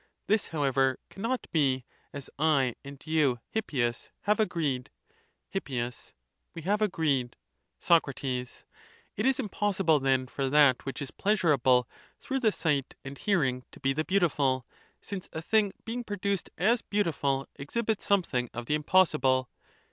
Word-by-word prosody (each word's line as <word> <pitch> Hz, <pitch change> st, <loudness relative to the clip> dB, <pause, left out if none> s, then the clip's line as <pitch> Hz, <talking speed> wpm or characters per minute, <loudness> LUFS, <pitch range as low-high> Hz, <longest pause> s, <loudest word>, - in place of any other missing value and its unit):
This 215 Hz, 0 st, +1 dB
however 135 Hz, -4 st, +1 dB
cannot 230 Hz, +6 st, -2 dB
be, 135 Hz, -5 st, +1 dB, 0.3 s
as 140 Hz, -1 st, -7 dB
1 140 Hz, -5 st, +3 dB
and 140 Hz, -1 st, -10 dB
you, 150 Hz, -6 st, +2 dB
Hippias, 125 Hz, -, -1 dB
have 210 Hz, +2 st, +1 dB
agreed. 155 Hz, -11 st, 0 dB, 0.6 s
Hip. 195 Hz, -6 st, -3 dB, 0.9 s
We 165 Hz, -, -7 dB
have 205 Hz, +5 st, +1 dB
agreed. 150 Hz, -, 0 dB, 0.4 s
Soc. 170 Hz, -3 st, +4 dB, 0.2 s
It 130 Hz, -1 st, 0 dB, 0.8 s
is 255 Hz, +5 st, +1 dB
impossible 195 Hz, -, +1 dB
then 130 Hz, -1 st, +2 dB
for 135 Hz, +1 st, -2 dB
that, 140 Hz, -3 st, +5 dB
which 135 Hz, +2 st, -4 dB
is 135 Hz, -, -7 dB
pleasurable 140 Hz, -, +3 dB, 0.3 s
through 270 Hz, -1 st, -2 dB
the 225 Hz, -4 st, +3 dB
sight 150 Hz, -8 st, -1 dB
and 135 Hz, +1 st, -6 dB
hearing, 135 Hz, -9 st, 0 dB
to -, -, -14 dB
be 135 Hz, 0 st, +1 dB
the 155 Hz, +3 st, -1 dB
beautiful; 145 Hz, -9 st, +1 dB, 0.4 s
since 195 Hz, -3 st, -6 dB
a -, -, -3 dB
thing 210 Hz, +1 st, +2 dB
being 240 Hz, +2 st, -3 dB
produced 200 Hz, -3 st, -2 dB
as 230 Hz, +7 st, +3 dB
beautiful 145 Hz, -9 st, 0 dB
exhibits 215 Hz, +9 st, -2 dB
something 145 Hz, -, +1 dB
of 120 Hz, 0 st, -4 dB
the 150 Hz, -, -1 dB
impossible. 140 Hz, -6 st, +3 dB
150 Hz, 140 wpm, -29 LUFS, 135-200 Hz, 0.9 s, that